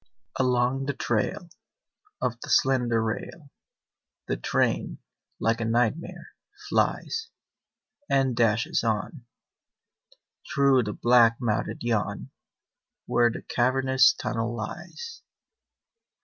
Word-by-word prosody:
Along 130 +1 +1
the 140 - -2
trail 120 +10 -1 0.8
Of 120 -1 -2
the - - -8
slender 125 -4 +2
rail 140 +6 -5 0.8
The - - 0
train, - - 0 0.4
like 115 +1 +1
a - - -1
nightmare, 120 +7 -1 0.4
flies 455 -1 0 0.8
And 135 -2 +2
dashes 115 -1 +1
on 115 +4 -2 1.3
Through 135 -3 +3
the 105 - -3
black 120 -1 +4
mouthed 115 -2 -2
yawn 115 -4 -2 0.7
Where 120 0 +3
the 115 - -7
cavernous 130 0 +3
tunnel 115 +1 -3
lies. 175 - -7
120 Hz, 95 wpm, -26 LUFS, 115-135 Hz, 1.3 s, black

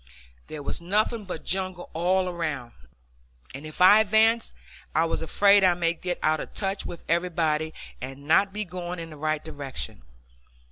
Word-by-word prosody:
There 150 -2 -7
was 140 - -3
nothing 210 +4 0
but 180 -4 -6
jungle 185 -1 -2
all 185 +3 +1
around, 165 -9 -3 0.8
and 140 +4 -7
if 155 - -9
I 195 +4 +9
advanced 220 +2 +3 0.4
I 160 +2 +4
was 165 - -2
afraid 200 +4 +4
I 180 -2 +5
might 170 -1 -1
get 180 -1 -2
out 155 0 +2
of - - -8
touch 195 -1 -2
with 170 - -8
everybody 160 -3 +1 0.3
and 135 +2 -7
not 195 +5 +4
be 210 +1 -4
going 180 0 -5
in 165 -1 -7
the - - -9
right 155 +1 -2
direction. 140 - -6
175 Hz, 170 wpm, -26 LUFS, 155-190 Hz, 0.8 s, I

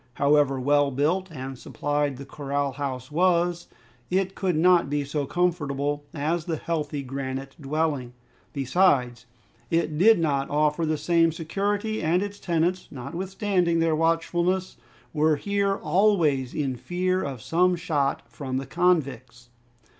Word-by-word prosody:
However 140 -2 +3
well 145 +2 +3
built 160 +8 0
and 135 -3 -7
supplied 145 -1 -2
the 140 - -8
corral 140 -1 -2
house 130 -1 -5
was, 175 +1 +1 0.4
it 190 +1 0
could 185 -4 -1
not 170 -2 +4
be 145 0 0
so 140 0 -2
comfortable 145 -5 -1
as 160 +2 -2
the 170 -3 -1
healthy 150 -4 -3
granite 135 0 -5
dwelling. 145 -3 -1 0.4
Besides, 130 -4 +1 0.4
it 160 -2 0
did 220 +4 +6
not 140 -5 0
offer 150 +2 +1
the 155 0 0
same 165 +1 +3
security, 200 +6 -2
and 170 +4 +2
its 205 0 -6
tenants, 175 +1 0
notwithstanding 180 - -1
their 165 -1 +2
watchfulness, 170 +3 0 0.4
were 155 0 +3
here 200 +4 0
always 170 - +2
in 135 -4 -1
fear 185 +6 -1
of 135 -3 -4
some 180 +2 +2
shot 150 -5 -1
from 130 -3 -5
the 135 - -3
convicts. 135 -8 -1
155 Hz, 135 wpm, -25 LUFS, 140-180 Hz, 0.4 s, did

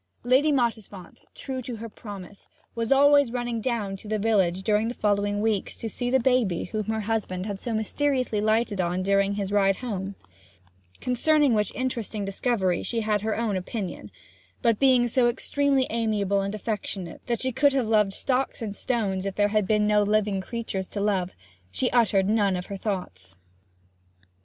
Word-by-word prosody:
Lady 260 +5 +4
Mottisfont, 225 -8 -3
true 260 -2 -5
to 245 -1 -6
her 225 +1 -7
promise, 205 -3 -10 0.3
was 230 +1 -3
always 285 -1 +5
running 240 -2 -2
down 215 -5 -2
to 195 - -12
the 215 +1 0
village 195 -4 +1
during 210 +2 +2
the 240 - -4
following 205 0 0
weeks 215 -3 -1
to 225 - -4
see 245 +3 -3
the 265 +1 +3
baby 240 -8 +1
whom 215 +2 -3
her 220 +1 -1
husband 205 -4 -2
had 200 -2 -4
so 235 - -4
mysteriously 250 +1 0
lighted 215 -2 +1
on 180 +1 -1
during 200 +1 +2
his 200 -1 -3
ride 195 -1 +3
home 200 -5 -5 0.9
concerning 285 +2 +3
which 210 -1 +1
interesting 230 -5 -2
discovery 195 -3 0
she 230 -1 -2
had 210 -2 0
her 220 0 -1
own 225 -3 0
opinion; 185 - -5 0.5
but 230 -3 +3
being 255 -3 +4
so 240 +1 +3
extremely 275 +2 +1
amiable 210 -3 0
and 200 +2 -3
affectionate 205 -4 -4
that 235 -2 0
she 260 - 0
could 280 +3 +3
have 260 -5 +1
loved 210 -3 +3
stocks 260 +5 -1
and 220 -4 -4
stones 205 -5 -1
if 195 - -4
there 205 0 +2
had 210 -2 +1
been 210 0 +2
no 210 0 +4
living 205 -1 +1
creatures 195 -3 -4
to 205 - -5
love, 195 -3 0 0.4
she 95 +1 -1
uttered 210 -5 +3
none 205 -3 +2
of 180 0 -4
her 200 - -6
thoughts. 100 - -5
215 Hz, 175 wpm, -26 LUFS, 195-240 Hz, 0.9 s, always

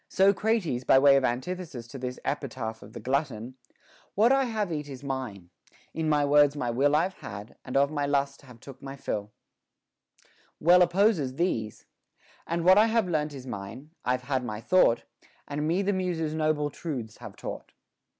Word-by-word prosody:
So 195 +1 +4
Crates, 195 - 0
by 130 - +5
way 140 +1 +7
of 135 - +3
antithesis 130 +1 -3
to 135 - -8
this 125 0 -4
epitaph 120 -6 -3
of 105 +2 -13
the - - -7
glutton, 130 -1 -2 0.6
What 225 +5 +5
I 270 0 +4
have 215 -7 -2
eat 150 -1 -4
is 135 -1 -9
mine; 125 -10 -5 0.4
in 160 -1 -1
words 145 -1 +4
my 125 -4 -2
will 140 +5 +2
I've 180 +5 +1
had, 100 +1 -8
and 130 - -2
of 140 +1 +3
my 145 -2 -1
lust 140 -1 0
have 125 -4 -15
took 135 +2 -12
my 135 0 -7
fill, 105 -6 -4 1.3
well 175 +3 +6
opposes 175 - +3
these, 115 - -2 0.6
What 170 +4 +5
I 220 - +5
have 225 -3 +1
learnt 150 -3 -1
is 130 -2 -9
mine; 120 +6 -7
I've 125 0 0
had 130 -1 -1
my 105 -3 -4
thought, 120 -2 +3 0.4
And 150 +1 -2
me 180 +5 +1
the 205 +1 +1
Muses 175 -5 -1
noble 155 -2 0
truths 130 -11 -6
have - - -10
taught. - - -7
145 Hz, 175 wpm, -27 LUFS, 125-170 Hz, 1.3 s, way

